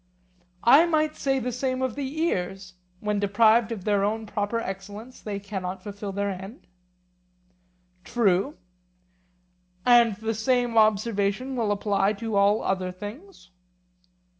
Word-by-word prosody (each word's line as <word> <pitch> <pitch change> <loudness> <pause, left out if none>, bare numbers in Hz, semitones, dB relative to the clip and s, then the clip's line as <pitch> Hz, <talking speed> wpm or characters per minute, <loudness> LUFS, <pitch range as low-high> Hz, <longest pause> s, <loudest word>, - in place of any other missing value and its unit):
I 290 +8 +7
might 310 -2 +1
say 270 -1 0
the 250 -1 -2
same 255 +1 -2
of 260 -3 -1
the 280 +3 -5
ears; 190 - -2 0.3
when 210 -1 -1
deprived 220 +3 +3
of 210 -5 -5
their 205 -1 +1
own 220 +2 -1
proper 205 +2 -2
excellence 205 +4 -7
they 205 -2 -4
cannot 190 -2 -5
fulfil 205 -1 -6
their 200 +1 -1
end? 195 +5 -9 1.4
True. 225 - +1 1.3
And 235 -3 +5
the 220 +2 -3
same 245 +1 0
observation 215 +3 +2
will 225 -4 0
apply 200 0 +1
to 225 0 -4
all 200 +2 +3
other 185 -1 -1
things? 205 - -10
215 Hz, 130 wpm, -26 LUFS, 200-245 Hz, 1.4 s, I